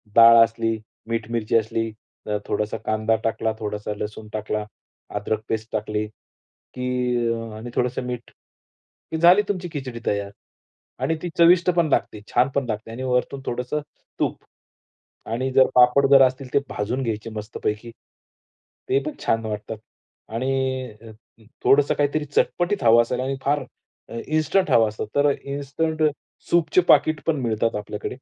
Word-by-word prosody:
डाळ 115 0 +9
असली, 115 0 -1 0.3
मीठ, 115 -1 -3
मिरची 115 -1 -1
असली, 115 0 -1 0.5
थोडासा 105 +1 -2
कांदा 110 +1 +1
टाकला, 110 0 0
थोडासा 105 -1 -4
लसूण 105 +1 -6
टाकला, 105 0 -2 0.5
अदरक 105 +1 -1
पेस्ट 110 0 -3
टाकली 105 0 -2 0.7
की 125 0 -3 0.7
आणि 120 +2 -7
थोडंसं 125 +1 0
मीठ 120 -1 -5 0.8
की 160 - -1
झाली 175 +5 +7
तुमची 180 -3 -2
खिचडी 130 -5 -5
तयार. 100 -1 -1 0.7
आणि 165 - +1
ती 175 - -3
चविष्ट 175 +1 +6
पण 165 -2 +4
लागते, 105 -5 0
छान 130 +2 +4
पण 140 -2 +1
लागते, 110 +1 -4
आणि 130 +3 -6
वरतून 130 +2 -1
थोडंसं 125 +5 -2 0.4
तूप - - -1 0.9
आणि 130 +3 -1
जर 130 -1 +6
पापड 125 +3 +6
जर 135 -1 +9
असतील 130 0 -8
तर 140 - +5
ते - - -11
भाजून 125 +6 -2
घ्यायचे 115 -1 -3
मस्तपैकी. 105 +1 -4 1.0
ते 135 - +3
पण 155 - -3
छान 115 0 +1
वाटतात 105 +1 -5 0.6
आणि 130 0 -1
अ, 115 - -13
अ, 110 +1 -20 0.2
थोडंसं 140 +1 +4
काहीतरी 145 +1 0
चटपटीत 175 +6 0
हवं 115 0 +7
असेल. 125 +1 -2
आणि 130 +2 -1
अ, - - -5
फार 145 -1 +1 0.6
इन्स्टंट 155 +5 +1
हवं 115 -1 +5
असेल 110 0 -5
तर 145 0 +4
इन्स्टंट 145 +3 -2 0.5
सूपचे 170 +1 +3
पाकीट 155 -2 +5
पण 150 -4 +1
मिळतात 115 -1 0
आपल्याकडे. 105 0 -5
125 Hz, 150 wpm, -23 LUFS, 110-140 Hz, 1.0 s, डाळ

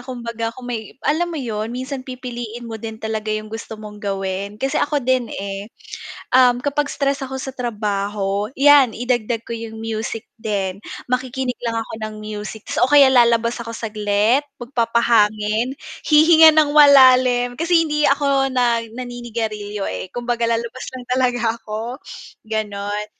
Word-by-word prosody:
kumbaga 235 -3 -5
kung 255 - -10
may 235 -1 -6
alam 340 +4 +1
mo 330 - -5
yun 220 -5 -3
minsan 260 +3 -5
pipiliin 245 -2 -7
mo 225 -2 -7
din 220 -1 -6
talaga 220 -1 -4
yung 215 0 -3
gusto 225 0 -7
mong 210 -1 -10
gawin 195 0 -3
kasi 270 +6 -1
ako 290 -3 0
din, 255 -2 +1
eh. 200 +1 -6 0.7
Um, 250 -1 +6
kapag 285 +3 -1
stress 275 -1 -1
ako 265 0 -5
sa 265 0 -6
trabaho, 205 -3 -2
yan 275 -4 +6
idagdag 240 -2 -1
ko 235 - -5
yung 225 -1 -7
music 225 0 -4 0.2
din 195 -2 -2 0.2
makikinig 250 0 -2
lang 230 -1 -2
ako 225 - -5
ng 215 0 -4
music 215 0 -7
tapos - - -2
o 250 - +4
kaya 280 -2 +7
lalabas 235 -1 +3
ako 230 -1 -7
saglit, 215 +3 +1 0.2
magpapahangin, 230 -1 +1 0.2
hihinga 320 +1 +7
ng 305 -2 +3
malalim 255 -4 +6
kasi 335 -1 +3
hindi 300 -2 +2
ako 275 -1 +2
na 245 -3 +1
naninigarilyo, 225 -4 -5
eh, 185 - -5
kumbaga 240 0 -2
lalabas 235 +2 -3
lang 250 - -10
talaga 245 -3 +1
ako, 225 +5 -6 0.4
ganon, 210 -1 -3
235 Hz, 150 wpm, -20 LUFS, 215-260 Hz, 0.7 s, kaya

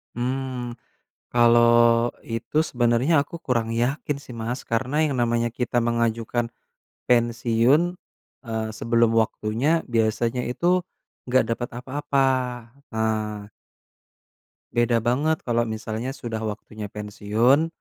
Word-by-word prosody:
Mmm, 125 0 -3 0.6
kalo 120 0 +5 0.7
itu 115 +5 -3
sebenernya 120 +5 +2
aku 145 - -10
kurang 115 -6 -1
yakin 130 +5 -1
sih, 125 -3 -11
Mas, 115 +3 -3
karena 125 +5 -1
yang 145 -3 0
namanya 120 -1 +1
kita 120 0 +1
mengajukan, 115 0 0 0.6
pensiun, 120 +7 +3 0.5
eee, 110 -2 -3
sebelum 115 0 +2
waktunya, 115 +8 +1
biasanya 115 +1 0
itu 175 +8 +1 0.4
nggak 130 0 +4
dapet 120 +1 -2
apa-apa, 140 +1 0 0.7
eee 110 -2 -2 1.2
Beda 120 0 +2
banget 145 +7 +1
kalo 120 -1 0
misalnya 110 +4 -4
sudah 115 -4 -5
waktunya 105 0 -8
pensiun, 105 +8 +1
120 Hz, 105 wpm, -24 LUFS, 115-130 Hz, 1.2 s, kalo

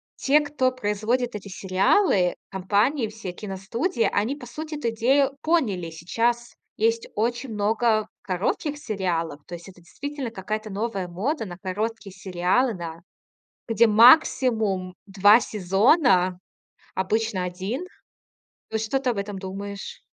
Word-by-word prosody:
те, 290 +3 +4
кто 290 -3 0
производит 235 +1 -1
эти 200 -1 -7
сериалы, 190 - +2
компании, 205 +7 +1
все 215 -4 -7
киностудии, 215 - -2
они, 220 +7 0
по 250 - -10
сути, 310 +5 -6
эту 240 -5 -1
идею 265 +5 +2
поняли. 220 - +1
Сейчас 230 +9 -1 0.2
есть 230 +1 +1
очень 240 +4 -1
много 215 +1 +1
коротких 205 - -2
сериалов. 175 - -2
То 175 - -7
есть 170 +2 -11
это 180 -2 -14
действительно 275 - -6
какая-то 215 +1 -4
новая 200 -2 -3
мода 225 - -2
на 175 -3 -8
короткие 205 +2 -4
сериалы, 190 +6 +1
да, 170 -3 -7 0.7
где 230 +1 +4
максимум 220 - +4
2 205 +2 +6
сезона, 195 - +3 0.6
обычно 205 0 0
1. 190 - -4 0.9
Вот 220 0 -1
что 225 +5 0
ты 265 -2 -1
об 230 - -5
этом 200 0 -4
думаешь? 195 +1 -7
215 Hz, 130 wpm, -24 LUFS, 190-245 Hz, 0.9 s, 2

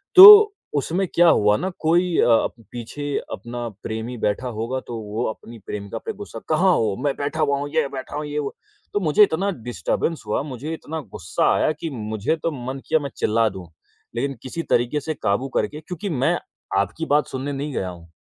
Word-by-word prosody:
तो 415 +2 +12 0.2
उसमें 175 +7 0
क्या 175 0 +6
हुआ 105 -6 +4
ना, 190 - -2
कोई 170 +2 +2
अ, 115 -2 +4 0.2
पीछे 140 +4 -4 0.2
अपना 120 +3 -5 0.2
प्रेमी 110 +2 -4
बैठा 110 +4 -1
होगा, 120 +4 -2
तो 120 -2 -7
वो 105 +2 -3
अपनी 115 +1 -9
प्रेमिका 100 +1 -5
पे 225 - -3
गुस्सा, 115 - -7
"कहाँ 180 +4 +4
हो? 105 -3 0
मैं 140 -2 +1
बैठा 145 +2 -2
हुआ 140 -2 +2
हूँ, 145 +1 -4
ये 155 -3 +3
बैठा 130 +1 -7
हूँ, 150 +1 -3
ये 150 0 -3
वो।" 140 -2 -4 0.4
तो 205 - +2
मुझे 175 +3 +5
इतना 195 +1 +1 0.2
डिस्टर्बेंस 160 +6 -2
हुआ, 105 - 0
मुझे 145 +2 -5
इतना 160 0 -5 0.2
गुस्सा 85 - 0
आया - - +2
कि 165 - -3
मुझे 110 +1 -2
तो 165 - +1
मन 130 +2 -4
किया 160 - +3
मैं 140 - -4
चिल्ला 115 +1 +2
दूँ। 95 -3 -9 0.5
लेकिन 135 +4 -1
किसी 165 +6 -4
तरीके 120 +5 +2
से 155 +2 -3
काबू 125 0 -1
करके 150 - -1
क्योंकि 180 +4 -5
मैं 155 +3 +1 0.4
आपकी 100 - -1
बात 150 - +3
सुनने 135 +2 -4
नहीं 140 +1 -4
गया 95 -6 -2
हूँ, 85 -2 -12
140 Hz, 195 wpm, -22 LUFS, 115-160 Hz, 0.5 s, तो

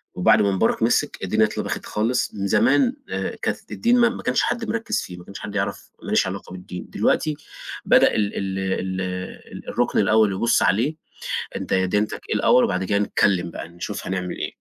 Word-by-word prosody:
وبعد 90 - +5
ما 100 - +2
مبارك 105 +4 +1
م 115 - +4
سِك 145 +4 +1
الدنيا 110 +4 +3
اتلبخِت 105 - -4
خالص 120 +4 0
من 100 -1 -2
زمان 245 - +3 0.2
آآ - - -3
كانت - - -3
الدين 240 +1 +2
ما 235 0 +5
ما 240 - -7
كانش - - +2
حد 235 -1 -1
مركِز 225 0 -1
فيه 90 - -8
ما 90 - -12
كانش 100 - -9
حد 105 -1 -7
يعرف 100 -1 -3
ماليش - - +2
علاقة - - -6
بالدين 90 -1 -8
دلوقتي 155 -1 +1 0.5
بدأ - - +5
ال 105 -1 0
ال 95 -1 -2 0.4
ال 90 0 -6
الرُكن - - +1
الأول 110 -2 +4
يبُص 115 +5 +2
عليه 120 +11 +2 0.6
أنت - - -3
ديانتِك 95 +3 +1 0.2
اٍيه - - 0
الأول 125 - +5
وبعد 95 0 0
كده 100 +2 +1
نتكلم 95 -3 +1
بقي - - -7
نشوف 85 +1 -6
هنعمل 90 -1 -3
إيه. - - -4
100 Hz, 190 wpm, -23 LUFS, 95-125 Hz, 0.6 s, وبعد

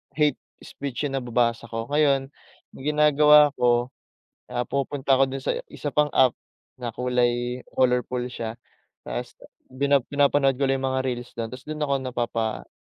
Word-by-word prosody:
hate 150 -3 +2 0.3
speech 140 0 -5
yung 135 - -4
nababasa 120 -1 0
ko. 115 +1 -5
Ngayon 140 -2 +2 0.4
ginagawa 150 0 +5
ko, 120 +1 +2 0.6
ah, 120 0 -1
pumupunta 140 0 0
ako 135 - +5
dun 135 0 -5
sa - - 0 0.2
isa 145 - -4
pang 150 0 +3
app 130 -2 +5 0.4
na 120 -3 -5
kulay 125 0 0
colorful 125 -1 +1
siya 115 -2 -5 0.5
tapos - - -5 0.5
pina 140 -2 +4
pinapanood 140 -1 +2
ko 140 - +2
lang 135 0 0
yung 135 - +1
mga 130 0 -1
reels 125 -1 -4
do'n 115 -1 -3
tapos 125 +2 -10
dun 155 0 -6
ako 140 -1 0
napapa 115 -3 -2
130 Hz, 155 wpm, -25 LUFS, 120-140 Hz, 0.6 s, ginagawa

